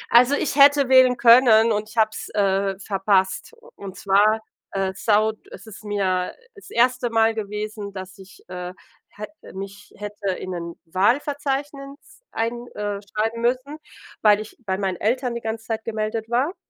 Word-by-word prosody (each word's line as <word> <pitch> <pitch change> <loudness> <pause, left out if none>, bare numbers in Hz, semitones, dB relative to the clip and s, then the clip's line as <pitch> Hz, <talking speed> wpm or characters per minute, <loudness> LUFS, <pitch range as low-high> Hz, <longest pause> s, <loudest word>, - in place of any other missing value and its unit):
Also, 250 +4 +6
ich 285 - -1
hätte 280 -1 +6
wählen 260 -1 +6
können 230 -2 +6
und 210 +1 -2
ich 220 - -15
habe 220 - +5
es, - - -7
äh, 195 -1 0
verpasst. 195 - 0
U 485 - -18
und 195 -2 -9
zwar, 205 +3 +3 0.3
äh, 195 -1 -1
saud 215 +1 +1
es - - -12
ist 215 0 -12
mir, 190 -3 -1
äh, - - -27
das 405 - -15
1. 245 0 +1
Mal 225 0 +3
gewesen, 210 -1 -5
dass 190 -1 -9
ich, 190 0 -15
äh, 180 0 -6 0.4
hätte 210 +6 -11
mich 195 +1 -9
hätte 205 -1 -4
in 185 - -7
'nen 170 -2 -6
Wahlverzeichnis 275 - -2
ein, 235 +2 -3
äh, 205 -1 -3
schreiben 220 +3 -3
müssen, 255 +5 -1 0.5
weil 210 -1 +5
ich 215 - -10
bei 190 -1 -1
meinen 190 -2 -2
Eltern 245 +5 -1
die 235 - -5
ganze 220 0 -5
Zeit 220 -1 -3
gemeldet 220 0 -3
war 265 +9 0
215 Hz, 170 wpm, -22 LUFS, 200-245 Hz, 0.5 s, Also